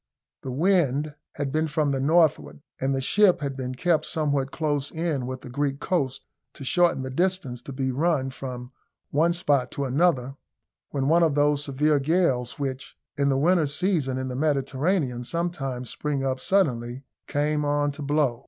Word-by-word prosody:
The 135 - -6
wind 150 -2 +2 0.2
had 140 -2 -3
been 155 +2 +1
from 150 -1 0
the 135 - 0
northward, 155 0 +2 0.2
and 135 +1 0
the 135 - -1
ship 185 +3 +4
had 140 -2 -3
been 130 -1 -4
kept 170 +3 +1
somewhat 145 -4 0
close 145 -2 -1
in 160 -6 -2
with 130 0 -5
the - - -10
Greek 140 +1 -1
coast, 140 -8 -1 0.3
to - - -9
shorten 170 -1 +2
the 130 - -5
distance 170 -6 -1
to 140 - -9
be 130 0 -1
run 140 -1 +1
from 125 -1 -7 0.4
one 160 +4 +3
spot 145 -7 +1
to 140 - -2
another, 135 -2 +1 0.5
when 135 -2 -1
one 165 +3 +4
of 160 -4 +3
those 145 0 +2
severe 145 +1 +2
gales, 135 -5 +1
which 135 -1 -5 0.2
in 140 0 +1
the 135 - +2
winter 165 +2 +3
season 145 -3 0
in 130 0 -3
the 125 - -4
Mediterranean 140 -1 0
sometimes 135 -5 -3
spring 145 -2 -2
up 130 -1 -1
suddenly, 130 -10 0 0.2
came 150 +1 0
on 145 0 +1
to 145 +2 -9
blow. 145 -4 +1
140 Hz, 175 wpm, -25 LUFS, 130-160 Hz, 0.5 s, ship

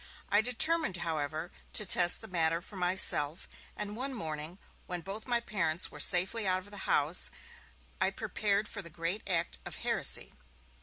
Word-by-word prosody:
I 205 +1 +4
determined, 280 - +3
however, 155 +1 -3 0.2
to 210 - +4
test 175 -2 +4
the - - -6
matter 165 -2 +1
for 185 +3 -10
myself, 180 -4 +2 0.3
and 210 0 -4
one 265 +3 -4
morning, 155 -3 -5 0.3
when 180 -2 -3
both 200 +7 -8
my 240 -1 +1
parents 185 -7 -1
were - - -12
safely 190 +4 +4
out 185 0 +3
of 205 +2 -14
the 205 - -7
house, 150 +5 +3 0.7
I - - +2
prepared 205 0 -1
for 205 - -5
the 170 - -10
great 170 +5 -4
act 170 -2 -1
of - - -8
heresy. - - +2
185 Hz, 165 wpm, -30 LUFS, 165-210 Hz, 0.7 s, I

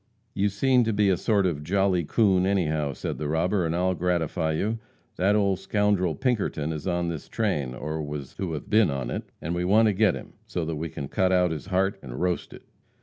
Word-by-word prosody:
"You 100 +1 +1
seem 125 +5 +3
to 110 - 0
be 100 -1 +3
a 95 - +4
sort 100 +1 +1
of 75 -5 -1
jolly 95 +1 +2
coon, 95 +1 +3
anyhow," 80 -7 0
said - - -5
the 75 - -2
robber, 85 +4 +1
"and 80 - -1
I'll 90 +1 +1
gratify 85 -3 0
you. 110 +8 -1 0.4
That 95 +4 +3
old 100 -3 +2
scoundrel, 100 -5 +1
Pinkerton, 100 - -1
is 75 +3 -5
on 85 -1 0
this 80 -4 -6
train, 75 - -1
or 75 +3 -4
was 75 -2 -6
to 90 -4 -3
have 75 - -5
been 110 -3 +4
on 65 -3 -3
it, - - -4 0.2
and 80 - -2
we 85 0 -1
want 110 +4 +4
to - - +1
get 105 +1 +3
him, - - -9
so 85 - -2
that 80 -1 -3
we 80 +2 -3
can 70 -1 -6
cut 95 +5 +1
out 90 -2 +3
his 80 +2 -5
heart 95 +1 0
and 60 -3 -7
roast 90 -1 -1
it." - - -12
90 Hz, 225 wpm, -26 LUFS, 80-100 Hz, 0.4 s, a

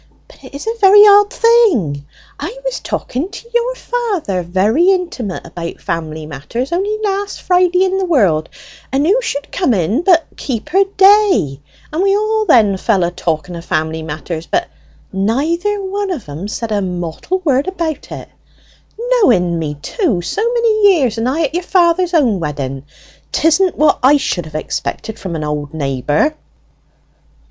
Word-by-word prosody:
But - - -20
it - - -12
is 280 - -7
a 450 - -1
very 405 +1 +8
odd 410 +1 +6
thing; 315 - +2 0.3
I 355 +12 -5
was - - -2
talking 280 +9 -4
to 465 - -11
your 480 +1 0
father 415 - -2
very 205 - +2
intimate 340 - -2
about 170 0 -7
family 160 -2 -4
matters 160 - -5
only 400 +5 -1
last 400 0 -2
Friday 360 0 +3
in 380 0 0
the 380 - 0
world, 195 - +2 0.4
and 275 +3 +1
who 420 +9 +3
should 285 -12 -4
come 270 - +1
in 195 - 0
but 350 -3 +4
Keeper 300 - 0
Day, 385 - +4 0.3
and 320 - 0
we 395 +1 +3
all 430 0 0
then 215 - +4
fell 195 -2 +1
a 170 - 0
talking 170 -1 -3
o' 170 - -7
family 160 -1 -2
matters; 160 +1 -6
but 350 0 -1 0.4
neither 310 - 0
one 395 +1 -3
o' 355 - -1
them 165 - -8
said 225 +1 -5
a 205 -1 0
mortal 180 - -3
word 275 0 +2
about 335 -5 -4
it; - - -7 0.7
knowen 250 - +2
me 150 -2 -3
too 335 - 0
so 180 - -3
many 435 -4 +4
years, 250 -8 0
and 235 +3 0
I 315 +5 0
at 300 - -2
your 350 - -1
father's 355 0 +2
own 240 - +2
wedding. 140 -3 -4 0.5
'Tisn't 330 +3 +2
what 305 - +3
I 275 +3 +5
should 180 - -2
have 155 - -12
expected 210 +7 -4
from 180 -4 -5
an 155 - -3
old 150 0 -4
neighbour!" 145 - 0
280 Hz, 165 wpm, -16 LUFS, -, 0.7 s, very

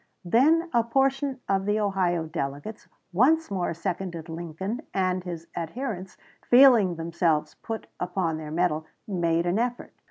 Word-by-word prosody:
Then 305 - +4
a 235 -1 +4
portion 270 +2 0
of 195 0 0
the 210 +1 +2
Ohio 185 -5 +1
delegates 155 +5 -5 0.3
once 295 - +3
more 185 -3 -1
seconded 170 -1 -4
Lincoln, 175 - -4
and 185 -1 +1
his 170 -2 -6
adherents, 190 - -5 0.3
feeling 240 -8 +6
themselves 165 -2 0
put 225 -1 -5
upon 180 -3 -1
their 155 -1 -7
mettle, 160 -1 0 0.2
made 170 -4 +1
an 175 +5 +1
effort. 245 +1 -2
185 Hz, 135 wpm, -26 LUFS, 170-230 Hz, 0.3 s, feeling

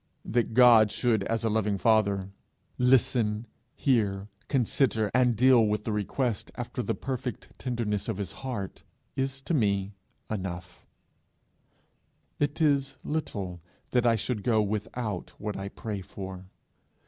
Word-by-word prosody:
That 115 -1 0
God 115 -4 +7
should 115 -3 +1
as 115 +2 -1
a 115 - +2
loving 105 -2 +1
father 100 -3 +2 0.5
listen, 120 -3 +3 0.3
hear, 105 -6 +1 0.2
consider, 120 -4 +1
and 125 -1 +4
deal 125 +1 +6
with 105 0 0
the 110 - -2
request 105 +2 -1
after - - -4
the - - -1
perfect 130 -2 -4
tenderness 115 -5 -2
of - - -2
his 100 -5 -3
heart, 120 -6 -5 0.3
is 135 0 -1
to 170 - -3
me 100 -6 +1 0.3
enough; 90 -4 -6 1.5
it 145 +2 0
is 140 -3 +2
little 100 - -3 0.3
that 125 -1 +3
I 115 - +5
should 110 0 -2
go 110 0 +2
without 105 -1 -3
what 105 0 -3
I 100 0 -4
pray 105 -1 -5
for. 95 0 -8
110 Hz, 135 wpm, -28 LUFS, 100-125 Hz, 1.5 s, God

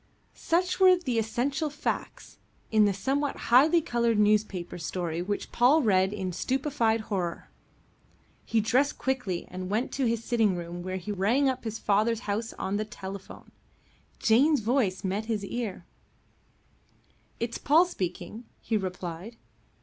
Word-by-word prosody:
Such 360 +3 0
were 370 -1 +7
the 260 -10 -1
essential 265 +8 -1
facts 295 +1 -5 0.3
in 215 -1 +5
the 205 - +3
somewhat 270 +9 -1 0.2
highly 310 +7 +6
coloured 235 -5 +1
newspaper 205 -4 +1
story 170 0 -3
which 205 +3 -3
Paul 275 +6 +4
read 190 -3 +3
in 190 -3 -4
stupefied 255 - 0
horror. 185 -6 -4 0.9
He 225 -1 +1
dressed 255 +7 +1
quickly 250 -10 -2
and 185 0 -5
went 220 +5 -1
to 275 - -1
his 230 0 -1
sitting 225 -6 +2
room, 175 0 -6
where 185 +1 -4
he 190 +3 -5
rang 220 +8 +2
up 260 -2 -2
his 220 0 -3
father's 215 +3 +1
house 220 +1 -3
on 195 +2 -2
the 215 - -2
telephone. 195 -2 -9 0.7
Jane's 275 +5 +4
voice 220 -4 0
met 200 +3 -2
his 215 -3 -2
ear. 210 -5 -4 1.5
"It's 235 0 -3
Paul 320 +5 +5
speaking," 190 - -5
he 225 - -1
replied. 185 +2 -5
220 Hz, 140 wpm, -28 LUFS, 190-255 Hz, 1.5 s, were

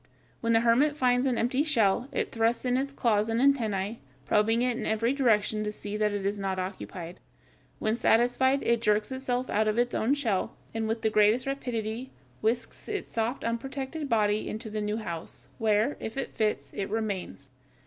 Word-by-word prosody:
When 230 0 +1
the 225 - +5
hermit 265 +6 +3
finds 250 -1 +3
an 250 -3 +1
empty 255 +4 +1
shell 240 -6 +2
it 270 - -2
thrusts 230 +2 +1
in 250 0 +2
its 275 +2 0
claws 225 -5 +1
and 225 +1 +1
antennæ, 225 -6 +1 0.3
probing 225 - +3
it 250 -1 +1
in - - -3
every 230 +3 +1
direction 220 -5 +2
to 210 - -2
see 210 0 -6
that 210 0 +1
it 205 -1 -3
is 200 +1 -1
not 195 -1 -2
occupied. 185 -2 -6 0.6
When 215 - 0
satisfied, 245 +4 +3
it 235 -1 +2
jerks 210 +2 +2
itself 260 -1 -2
out 215 +1 +2
of 215 +1 +1
its 245 0 +1
own 255 +6 +2
shell, 225 -10 -1 0.2
and 225 -1 -1
with 225 +1 -2
the 220 - +2
greatest 215 +4 +4
rapidity 245 -3 -3 0.3
whisks 235 - -2
its 415 -1 -4
soft 230 +3 -1
unprotected 270 +5 -3
body 215 -2 +2
into 220 0 -5
the 215 0 -2
new 210 +1 -1
house, 170 -7 -7
where, 220 +4 +2
if 225 +4 -6
it 270 - -3
fits, 215 -1 -1
it 195 0 -3
remains. 195 -10 -4
225 Hz, 190 wpm, -28 LUFS, 210-250 Hz, 0.6 s, the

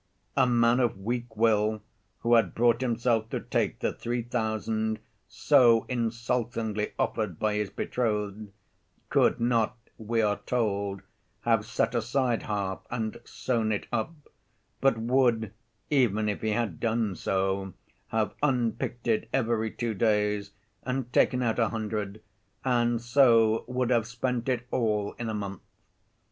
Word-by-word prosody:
A 130 -2 +4
man 120 0 +3
of 120 -5 +1
weak 120 +2 -4
will, 110 -1 +2 0.4
who 120 - +2
had 115 -1 +4
brought 120 +1 +3
himself 115 -2 +1
to - - -2
take - - -1
the - - 0
three 120 0 -3
thousand 110 -2 -1 0.3
so 115 -3 +4
insultingly 115 -2 -1
offered 105 -7 -1
by 110 -1 0
his 105 -1 -1
betrothed, 105 -1 -2 0.6
could - - +3
not, 115 -1 +1 0.2
we 115 +1 0
are 105 -1 +1
told, 100 -5 -1 0.4
have 115 -2 +1
set 115 - 0
aside 120 +1 0
half 100 -3 -2
and 115 -1 -3
sewn 115 -4 -1
it 105 - -2
up, 120 +5 -1 0.7
but 135 -4 +3
would, 115 -3 +2 0.4
even 110 -7 +2
if 105 - -2
he 110 - 0
had 105 -6 -1
done 110 -4 0
so, 95 0 -1 0.3
have 110 -1 -1
unpicked 120 -3 0
it 110 -1 +1
every 115 -3 +1
two 115 +1 -3
days 105 -1 +1 0.3
and 125 -1 -3
taken 125 0 +3
out 115 0 0
a 115 -2 +3
hundred, 105 -2 -4 0.4
and 120 -2 +1
so 115 -3 +4
would 125 0 -1
have 115 -3 +2
spent 120 +1 -2
it 125 -1 -1
all 105 -4 0
in 120 -1 -3
a - - -2
month. 100 -2 -5
115 Hz, 140 wpm, -28 LUFS, 105-120 Hz, 0.7 s, A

